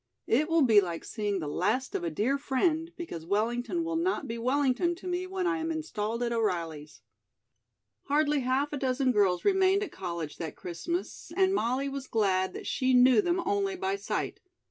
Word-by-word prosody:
It 300 +8 +2
will 330 -2 +4
be 220 -5 +6
like 170 -3 -5
seeing 205 -3 -2
the 160 -5 -4
last 210 - 0
of - - -2
a 170 - 0
dear 230 - 0
friend, 315 +4 0
because 320 - -6
Wellington 235 - -1
will 330 0 -2
not 335 -4 -1
be 230 -1 -4
Wellington 275 +7 +1
to 365 - -14
me 360 +1 -2
when 375 -1 -2
I 360 -1 +1
am 325 0 -2
installed 235 -8 -3
at 235 - -1
O'Reilly's." 165 -9 -2 1.0
Hardly 295 +1 +2
half 265 +3 0
a - - -1
dozen 260 0 +1
girls 195 -5 +2
remained 385 0 +4
at 410 - -6
college 170 -5 -5
that 160 -3 -5
Christmas, 340 - -5
and 380 0 +4
Molly 260 -4 0
was 275 -1 -5
glad 190 -4 +1
that - - -7
she 255 0 +1
knew 250 -2 +6
them 350 0 0
only 395 -1 0
by 385 +1 -1
sight. 395 - -3
260 Hz, 190 wpm, -29 LUFS, 210-335 Hz, 1.0 s, be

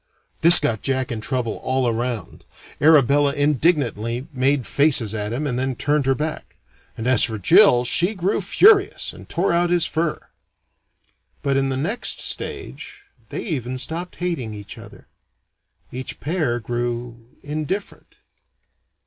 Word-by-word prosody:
This 170 +2 +10
got 110 -3 -1
Jack 130 -2 -2
in 115 -2 -4
trouble 125 -1 -3
all 130 -1 -1
around. 120 0 -4 0.4
Arabella 145 -2 +4
indignantly 140 - 0
made 135 0 0
faces 135 -8 +3
at 105 -1 -3
him 135 +6 -3
and 125 -3 -2
then 130 0 -2
turned 145 +1 0
her 135 - +2
back; 155 +2 -5 0.4
and 115 - -5
as 130 0 +4
for 110 -2 -1
Jill, 160 - +5
she 175 - +1
grew 190 +3 -1
furious, 400 - +3
and - - -14
tore 175 +1 0
out 175 0 +1
his 175 -2 +3
fur. 160 0 -2 1.2
But 140 -1 0
in 135 0 +1
the 130 - -1
next 200 - -1
stage, 415 - -5 0.3
they - - -5
even 130 - -4
stopped 165 +7 -4
hating 165 -12 -4
each 105 -1 -9
other. - - -14 0.9
Each 130 +1 -6
pair 150 -7 -1
grew 120 0 -4 0.2
indifferent. 155 +7 -6
135 Hz, 140 wpm, -21 LUFS, 120-165 Hz, 1.2 s, This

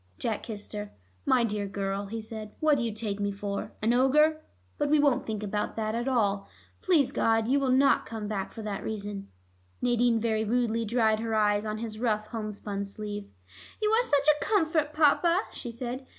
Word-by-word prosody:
Jack 220 - -2
kissed 210 -2 -7
her. 210 -1 -5 0.4
"My 250 -2 +4
dear 210 -3 -1
girl," 195 0 -3
he 225 +3 -4
said, 215 -1 -8
"what 310 -1 +4
do 265 - -1
you 230 - -1
take 210 -1 -3
me 200 0 0
for? 200 0 -4
An 225 +2 +3
ogre? 300 +5 +4 0.4
But 290 - +1
we 305 - +5
won't 285 -3 +2
think 215 -1 -3
about 210 0 -2
that 215 -1 -1
at 235 +3 -2
all. 205 -6 +1 0.3
Please 300 -8 +3
God, 225 -4 +2
you 275 +3 +3
will 270 -2 0
not 265 +2 +4
come 220 -2 -5
back 200 -2 -3
for 225 - -8
that 205 -2 -4
reason." 205 -2 -5 0.5
Nadine 240 -1 +2
very 220 -1 0
rudely 230 0 +1
dried 220 -1 +2
her 225 0 -1
eyes 210 0 +2
on 215 0 -2
his 220 -1 -5
rough 215 -3 0
homespun 210 -3 -4
sleeve. 205 0 -6 0.5
"You 425 0 +1
are 450 +2 +5
such 285 - +1
a 300 -1 +4
comfort, 320 -7 +1
Papa," 325 +4 +4
she 240 - -6
said. 250 +2 -5
225 Hz, 195 wpm, -28 LUFS, 210-265 Hz, 0.5 s, we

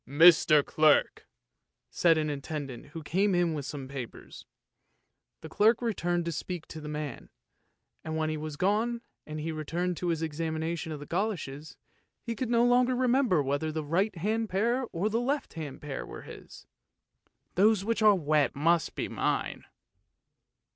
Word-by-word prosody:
" - - -58
" - - -44 0.2
Mr. 155 -4 +7
Clerk! 155 -1 +3 0.3
" - - -55 0.3
said 165 -2 +4
an 155 -1 0
attendant 140 -3 -5
who 160 +2 -8
came 190 +5 +1
in 175 -2 +2
with 145 -3 -4
some 140 -3 -6
papers. 130 -3 -9 0.9
The - - -8
clerk 220 +7 +4
returned 175 -7 -1
to 170 - -1
speak 170 +1 -5
to 160 - -8
the 150 - -7
man, 150 -1 -5 0.7
and 160 0 -3
when 155 0 0
he - - -2
was 155 -1 -5
gone 220 +6 +1 0.3
and 155 0 -5
he 160 +2 -3
returned 165 +3 -2
to 180 - -3
his 165 -1 0
examination 160 +1 -3
of 150 - -5
the 145 - -8
goloshes, 165 -6 -3 0.5
he 230 -1 -3
could 250 +1 -3
no 235 0 +4
longer 250 +1 +4
remember 245 - +2
whether 145 +3 -1
the 155 0 -3
right 190 +7 +1
hand 215 +6 -1
pair 235 +7 +1
or 175 +5 -1
the 225 +2 0
left 275 +4 -2
hand 150 -4 -7
pair 145 -2 -4
were - - -9
his. - - -12 0.9
"Those 200 +1 +3
which 230 0 0
are 210 -1 +7
wet 150 -5 +1
must 165 +3 +2
be - - -2
mine!" - - -2
165 Hz, 175 wpm, -29 LUFS, 150-210 Hz, 0.9 s, Mr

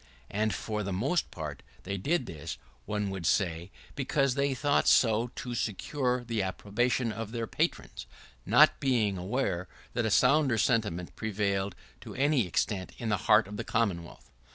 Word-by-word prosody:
And, 110 +2 +1
for 105 0 -3
the 100 -1 -3
most 135 - 0
part, 75 -4 -6 0.2
they 100 +2 -3
did 140 - 0
this, 80 -7 -6 0.3
one 105 -1 -1
would 95 -4 -3
say, 85 -2 0 0.2
because 135 -1 +1
they 140 0 0
thought 145 +2 +2
so 115 0 +4
to 125 - -5
secure 125 +3 -1
the 115 -3 -1
approbation 110 +6 0
of 110 0 -5
their 115 -1 -2
patrons, - - -2 0.4
not - - +5
being 115 -7 +1
aware 95 -2 -1 0.3
that 120 -2 0
a - - +1
sounder 130 +2 +4
sentiment 105 -7 0
prevailed 100 -2 -1 0.2
to - - -10
any 135 -5 +2
extent 95 +2 -1
in 115 -3 -3
the 105 - +2
heart 105 -1 +6
of 105 +1 -7
the - - -3
Commonwealth. 90 - -2
110 Hz, 160 wpm, -29 LUFS, 95-125 Hz, 0.4 s, heart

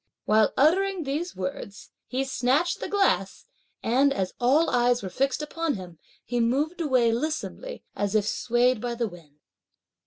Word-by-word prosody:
While 215 0 +4
uttering 370 +5 +3
these 305 +5 -3
words, 190 +2 -6 0.2
he 260 +1 -1
snatched 270 +6 +1
the - - -5
glass, 405 -1 +1 0.4
and, 265 +5 +3
as 190 -8 -2
all 280 +7 +3
eyes 245 -1 +2
were 190 - -4
fixed 275 +7 0
upon 325 -1 -2
him, 180 -4 -10 0.3
he 245 0 -2
moved 290 +9 0
away 255 -7 +3
lissomely, 310 - -4
as 205 +1 -1
if 210 -2 +3
swayed 240 +1 +1
by 240 0 -3
the 235 -1 -1
wind. 165 -6 -14
250 Hz, 155 wpm, -26 LUFS, 220-305 Hz, 0.4 s, While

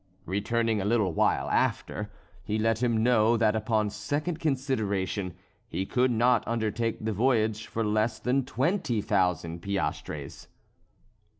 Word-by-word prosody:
Returning 110 +3 0
a - - -2
little 105 -5 +2
while 65 - +2
after, - - 0 0.3
he 105 - -1
let 115 +1 +1
him 115 -3 +2
know 120 -1 +4
that 110 -1 +3
upon 110 -1 0
second 150 - -3
consideration, 105 - -1 0.3
he 95 - -2
could 125 +5 +2
not 120 0 +3
undertake 115 0 -1
the 110 - 0
voyage 110 -1 +1
for 115 - -2
less 110 +1 +1
than 130 +4 +1
twenty 130 - 0
thousand 90 -5 0
piastres. 85 -6 -4
110 Hz, 130 wpm, -28 LUFS, 105-120 Hz, 0.3 s, know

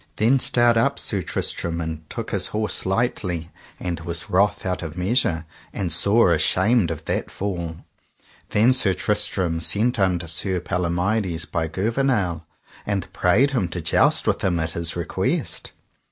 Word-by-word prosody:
Then 120 +5 +3
stert 120 -2 +3
up 140 +4 +2
Sir 100 -3 -1
Tristram 85 0 -2
and 80 -1 -5
took - - -5
his - - +1
horse 105 -3 -3
lightly, 95 -5 -1 0.3
and 90 -2 -3
was 85 +1 -5
wroth 100 +2 +2
out 90 -1 -1
of 85 0 -7
measure, 90 - 0 0.3
and 90 -5 0
sore 100 +2 +5
ashamed 95 +6 +2
of 80 -3 -6
that - - -2
fall. 85 -4 -5 0.6
Then 115 +5 +4
Sir 100 -7 +3
Tristram 95 -5 0
sent 110 +8 +1
unto 90 -3 +1
Sir 90 +3 +1
Palomides 90 0 -1
by 80 -3 -2
Gouvernail, 100 - 0 0.4
and 100 -3 -3
prayed 110 +11 +3
him 115 -10 0
to 85 +1 -4
joust 80 - +2
with - - 0
him 90 -3 +1
at 80 0 -2
his 85 0 -1
request. 85 -3 -2
90 Hz, 155 wpm, -23 LUFS, 85-105 Hz, 0.6 s, sore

